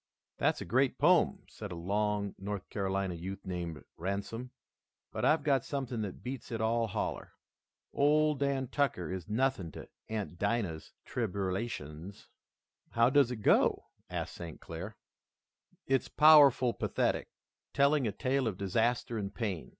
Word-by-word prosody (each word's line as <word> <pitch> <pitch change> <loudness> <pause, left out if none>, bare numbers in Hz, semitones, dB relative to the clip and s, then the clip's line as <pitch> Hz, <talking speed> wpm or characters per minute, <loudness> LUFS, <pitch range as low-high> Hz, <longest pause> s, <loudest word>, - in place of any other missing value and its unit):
"That's - - +1
a - - -4
great 130 +5 +2
poem," 170 +3 +3
said 105 -3 -8
a - - -4
long 100 +3 -1
North 100 0 -5
Carolina 95 -1 -1
youth 95 +3 -7
named 85 -4 -4
Ransome, 100 +7 -4 0.6
"but - - -4
I've 155 -1 +4
got 140 -4 +2
something 130 -5 -3
that 100 -3 -6
beats 130 0 -6
it 115 - -2
all 115 +1 +1
holler. 100 - -4 0.6
'Ole 150 +2 +4
Dan 140 -2 -1
Tucker' 120 - 0
is 95 -2 -5
nothing 120 -6 0
to - - -9 0.2
'Aunt 105 -5 -4
Dinah's 100 -7 -1
Tribberlations.'" 95 - -4 0.6
"How 115 +2 +4
does 140 -3 +5
it 115 -4 -5
go?" - - +3 0.2
asked - - -4
St. 85 -3 -8
Clair. 90 +6 -7 0.9
"It's 135 -1 +1
powerful 145 -5 +7
pathetic, - - -1 0.4
telling 140 -2 +3
a - - 0
tale 130 +4 0
of 100 -5 -2
disaster 115 +4 0
and 100 -1 -3
pain. 100 -8 -3
110 Hz, 140 wpm, -32 LUFS, 95-130 Hz, 0.9 s, powerful